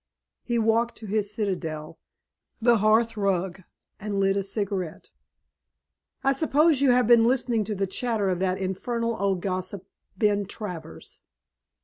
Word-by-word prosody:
He 240 -1 -2
walked 230 +1 +1
to 220 - -9
his 210 0 -1
citadel, 165 -7 -4 0.6
the 235 0 +4
hearth 225 +2 +3
rug, 190 -2 -1 0.4
and 200 -1 -3
lit 195 0 +2
a 200 - +1
cigarette. 195 -4 -4 1.1
"I 275 - +3
suppose 300 +1 +3
you 280 - +4
have 250 0 +4
been 230 0 +6
listening 240 -2 +2
to 210 +1 -3
the 195 0 0
chatter 220 +1 -1
of 180 -2 0
that 185 0 0
infernal 230 +5 -2
old 195 -3 0
gossip, 185 0 -3 0.3
Ben 205 -3 +1
Travers." 180 - -8
205 Hz, 140 wpm, -26 LUFS, 190-230 Hz, 1.1 s, been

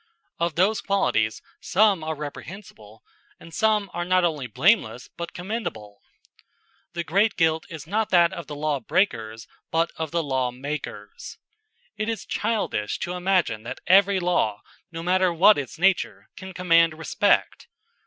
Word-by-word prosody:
Of 170 -2 -1
those 200 +4 +2
qualities 110 - 0 0.2
some 200 -3 +2
are 160 0 -3
reprehensible 145 - -10 0.4
and 165 - -14
some 215 0 +2
are 175 - -2
not 185 +1 +2
only 150 -7 -1
blameless 125 - +1
but 170 0 -6
commendable. 175 - -6 0.9
The 170 0 -3
great 200 +6 +2
guilt 160 -2 +1
is 160 -2 -8
not 210 +5 -1
that 175 0 +4
of 170 -2 -7
the 150 - -7
law 150 -1 -1
breakers 115 - -1 0.2
but 165 +1 +1
that - - -11
of 160 - -5
the 170 +1 -1
lawmakers. 130 -4 -4 0.6
It 215 +1 -2
is 225 - -4
childish 210 - -2
to 175 - -3
imagine 180 - 0
that 120 +3 -7
every 195 +1 +5
law, 175 - 0 0.3
no 165 0 -6
matter 185 +1 +2
what 195 +4 +5
its 140 +3 -7
nature, 190 +2 +1
can 190 0 -9
command 170 -3 +3
respect. 160 -3 +1
170 Hz, 150 wpm, -24 LUFS, 140-190 Hz, 0.9 s, every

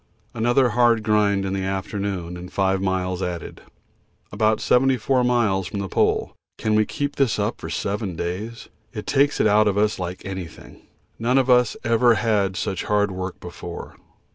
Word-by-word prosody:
Another 120 +3 +2
hard 120 -2 +3
grind 105 -2 +2
in 95 - -2
the 95 -1 -2
afternoon 95 -2 -3
and 90 +1 -9
five 95 -1 +1
miles 95 -1 -1
added. 90 -2 -5 0.7
About 110 +1 +1
74 130 +2 +2
miles 110 -7 +1
from 100 - -5
the 100 - -3
Pole - - +1 0.2
can 110 - -1
we 110 0 +3
keep 145 0 -3
this 135 -5 +2
up 105 +2 -2
for - - -6
seven 100 -2 -3
days? 100 +8 -5 0.3
It - - -6
takes 140 +1 +2
it - - +3
out 105 0 +4
of 100 -1 +1
us 105 -1 +1
like 90 0 -5
anything. 95 -4 -8 0.4
None 120 +3 +2
of 130 -1 +3
us 125 -2 +3
ever 115 +1 +4
had 105 -5 +1
such 95 - -2
hard 105 -1 +1
work 95 0 -5
before. 85 -1 -8
105 Hz, 170 wpm, -23 LUFS, 95-115 Hz, 0.7 s, out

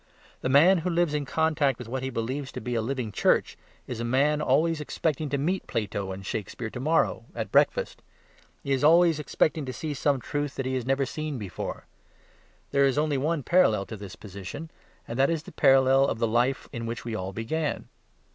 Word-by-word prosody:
The 130 - -1
man 165 +8 +6
who 175 +3 -2
lives 170 -2 +1
in 150 -1 -1
contact 150 -3 +1
with 125 - -8
what 130 +2 -3
he 130 - -2
believes 130 +3 -3
to - - -5
be 120 +2 -4
a 115 - +1
living 125 -1 -3
Church - - +2 0.3
is 120 - -6
a - - -2
man 140 +5 +2
always 155 +4 +2
expecting 150 0 -2
to 140 - 0
meet 175 +7 -1
Plato 100 -4 -3
and 95 +1 -7
Shakespeare 110 +3 -4
to - - -6
morrow 145 -5 +1
at - - -4
breakfast. - - +2 0.6
He 140 - -3
is 135 0 +1
always 165 0 +5
expecting 155 +1 0
to 130 - -4
see 150 +5 -4
some 140 0 +1
truth 145 +3 -3
that 135 - -3
he 130 - -1
has 130 -2 -2
never 135 +1 +2
seen 155 +1 -4
before. 100 -6 -6 0.9
There 140 0 +4
is 135 - 0
one 150 -1 +1
only - - +1
other 155 -2 0
parallel 110 - +3
to 110 - -7
this 100 -2 -9
position; 100 - -8 0.4
and 115 +2 -5
that 135 - +4
is 165 -2 -1
the - - -11
parallel 135 -1 +5
of - - -1
the 115 - +1
life 120 +4 +1
in 115 -1 -4
which 115 +1 -5
we 115 - -4
all 95 -2 -3
began. 140 +9 -3
135 Hz, 215 wpm, -27 LUFS, 115-150 Hz, 0.9 s, man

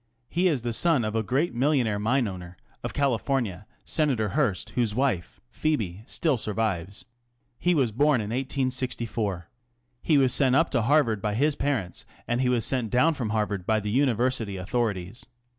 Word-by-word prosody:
He 180 +2 +2
the 120 -6 -1
son 145 -2 +3
of 110 - -2
the 110 - +1
great 135 +10 0
millionaire 125 -5 +1
mineowner, 105 -6 -1 0.3
ofCaliforn 120 -7 -1 0.2
Senator 130 -9 0
Hearst, 125 -7 -1
whose 115 -4 0
wife, 125 -10 -1
Phcebe, 110 - -2
still 150 -7 +1
survives, 100 -3 -2 0.6
was 150 -10 +2
born 145 +3 +3
in 105 0 -4
1864. 125 - -2 0.5
He 155 - +3
was 130 -3 +4
sent 130 -2 +3
up 165 +3 +3
to 120 - +2
Harvard 115 -5 +2
his 120 +9 +1
parents, 130 -13 -2 0.2
and 120 +1 0
he 125 - +2
was 120 -3 +2
sent 125 -4 0
down 125 +8 +3
from 125 -7 -3
Harvard 105 -4 -1
the 110 -2 0
University 120 -5 +1
authorities. 100 0 -3
120 Hz, 145 wpm, -26 LUFS, 105-135 Hz, 0.6 s, was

